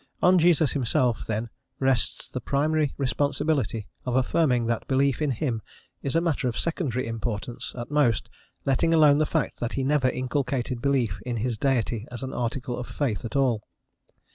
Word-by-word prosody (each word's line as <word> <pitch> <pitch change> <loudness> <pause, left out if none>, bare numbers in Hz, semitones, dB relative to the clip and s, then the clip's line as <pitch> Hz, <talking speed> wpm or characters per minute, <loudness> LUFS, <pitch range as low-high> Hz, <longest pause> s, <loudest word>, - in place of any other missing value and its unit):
On 180 0 +5
Jesus 160 -4 +4
himself 125 -3 0
then 110 +1 -2 0.3
rests 130 -4 +1
the - - -5
primary 150 +1 +1
responsibility 140 -5 0 0.2
of 125 -1 -2
affirming 130 -2 +2
that 115 0 -1
belief 135 +1 +2
in 150 - +1
him 120 -2 -1 0.4
is 140 - -2
a 165 - +4
matter 160 -6 0
of 120 - -2
secondary 145 -7 -1
importance, 115 0 -4
at 120 +3 -6
most, 140 -8 +2 0.4
letting 165 +5 +3
alone 150 -2 +6
the 155 - +2
fact 160 -4 -1
that 120 - -2
he 135 - -1
never 135 -1 +3
inculcated 130 -1 -2
belief 130 -8 +1
in 125 -2 -3
his 120 +2 -1
Deity 120 -2 0
as 120 +1 -7
an 130 - -4
article 125 +1 -2
of 125 - -5
faith 125 -9 -2
at 115 +4 -6
all. 130 -6 +2
130 Hz, 170 wpm, -26 LUFS, 120-145 Hz, 0.4 s, alone